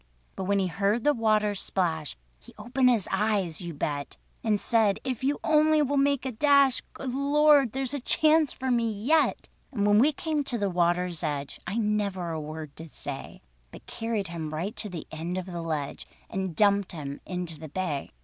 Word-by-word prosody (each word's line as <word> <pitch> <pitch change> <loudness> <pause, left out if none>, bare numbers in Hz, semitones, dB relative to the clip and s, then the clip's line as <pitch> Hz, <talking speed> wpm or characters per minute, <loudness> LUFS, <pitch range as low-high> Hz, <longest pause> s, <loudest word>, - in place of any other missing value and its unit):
But 190 - -4
when 200 +1 +2
he 195 - +2
heard 200 +5 0
the 295 - +4
water 215 -3 +2
splash, 165 - -1 0.2
He - - -17
opened 255 +1 +2
his 230 -6 +2
eyes—you 190 -5 -1
bet! 145 -1 -3 0.3
And 215 -2 +1
said: 220 -3 +2
"If 260 -2 -3
you 285 +2 +1
only 310 0 +4
will 285 0 -1
make 280 -1 +2
a 260 - -1
dash— 280 +1 +4
Good 260 -2 -5
Lord! 285 -2 +4
there's 265 0 -1
a 285 - -1
chance 310 +3 +3
for 260 0 -3
me 235 -2 +2
yet!" 260 +10 +1 0.2
And 205 -7 -1
when 205 0 +5
we 285 +6 +5
came 305 0 -2
to 245 - -1
the 200 -3 -1
water's 175 -1 +1
edge, 145 -4 -3
I 200 - -2
never 205 -5 -1
a 160 -1 -3
word 155 -1 -7
did 165 +2 -10
say, 140 -1 -7 0.3
But - - -13
carried 225 -5 -3
him 160 -2 -5
right 185 +7 -3
to 210 - 0
the 175 -4 -7
end 165 +3 -4
of 185 - -3
the 175 -2 -5
Ledge, 155 -4 -4 0.2
And 190 -3 -3
dumped 200 -1 +3
him 145 -3 -6
into 180 -4 -4
the 155 -1 -8
Bay. 155 -4 -3
205 Hz, 195 wpm, -27 LUFS, 170-260 Hz, 0.3 s, when